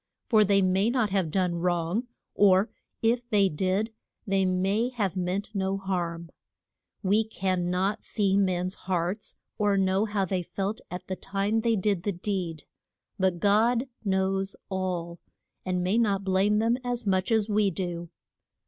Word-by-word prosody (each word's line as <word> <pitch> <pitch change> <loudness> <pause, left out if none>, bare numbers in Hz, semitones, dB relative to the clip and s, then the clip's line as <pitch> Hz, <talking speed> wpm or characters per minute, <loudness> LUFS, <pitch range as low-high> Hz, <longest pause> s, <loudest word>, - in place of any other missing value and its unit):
For 220 -3 +6
they 195 -1 +3
may 190 +4 +2
not 240 -5 +1
have 190 -4 +1
done 180 0 0
wrong, 175 +6 0 0.3
or 200 +1 +4 0.3
if 240 +1 +1
they 200 -4 +4
did 190 +7 -1 0.3
they 195 -2 +2
may 195 +6 +1
have 210 -7 -2
meant 185 +3 -2
no 195 -1 0
harm. 170 -3 -3 0.7
We 205 +3 +3
can 185 -4 -1
not 190 +3 0
see 200 -3 +1
men's 185 -2 +1
hearts, 185 +2 -3 0.2
or 205 -1 +3
know 190 +2 +2
how 205 -2 0
they 185 0 -1
felt 195 +4 -3
at 180 +1 -6
the 185 - -3
time 200 +4 -1
they 230 0 +2
did 200 -2 0
the 200 +2 -1
deed. 175 -4 -3 0.6
But 190 -2 +2
God 225 +6 +3 0.2
knows 195 0 0
all, 180 -3 -3 0.5
and 180 -1 0
may 195 +6 +2
not 200 -4 +1
blame 195 +2 +2
them 230 +3 +2
as 245 -2 -1
much 190 +1 +1
as 220 -2 +3
we 210 -1 +2
do. 175 -2 -4
195 Hz, 155 wpm, -27 LUFS, 185-210 Hz, 0.7 s, For